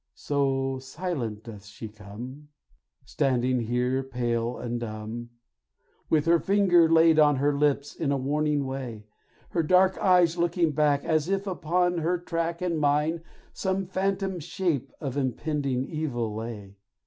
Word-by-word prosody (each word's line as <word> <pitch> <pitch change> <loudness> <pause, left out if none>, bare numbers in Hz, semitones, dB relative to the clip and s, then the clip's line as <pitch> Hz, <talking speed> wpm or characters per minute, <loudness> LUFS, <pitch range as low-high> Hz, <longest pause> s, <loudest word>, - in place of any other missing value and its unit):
So 135 -2 0
silent 130 - -4
doth 105 -4 -10
she 105 +2 -9
come, 110 +8 -10 0.6
Standing 130 -2 +1
here 125 +3 0
pale 120 -2 -2
and 120 0 -3
dumb, 115 +1 -6 0.8
With 155 -2 +2
her 170 0 +4
finger 185 -4 +4
laid 160 -1 +5
on 150 -1 +5
her 140 +2 +1
lips 145 0 +1
in 145 -3 -1
a 140 - +1
warning 145 +1 0
way; 125 -5 -6 0.4
Her 170 - 0
dark 185 +4 +3
eyes 180 -2 +4
looking 170 -1 +2
back, 145 -1 +2
As 155 +1 +1
if 195 0 0
upon 175 0 0
her 170 +3 +1
track 170 0 -3
And 170 -3 0
mine, 150 +3 +1 0.3
some 190 0 -1
phantom 190 0 -1
shape 160 -5 -2
of 140 -2 -4
impending 135 -1 -1
evil 130 -8 -3
lay. 105 -3 -7
145 Hz, 140 wpm, -27 LUFS, 125-170 Hz, 0.8 s, laid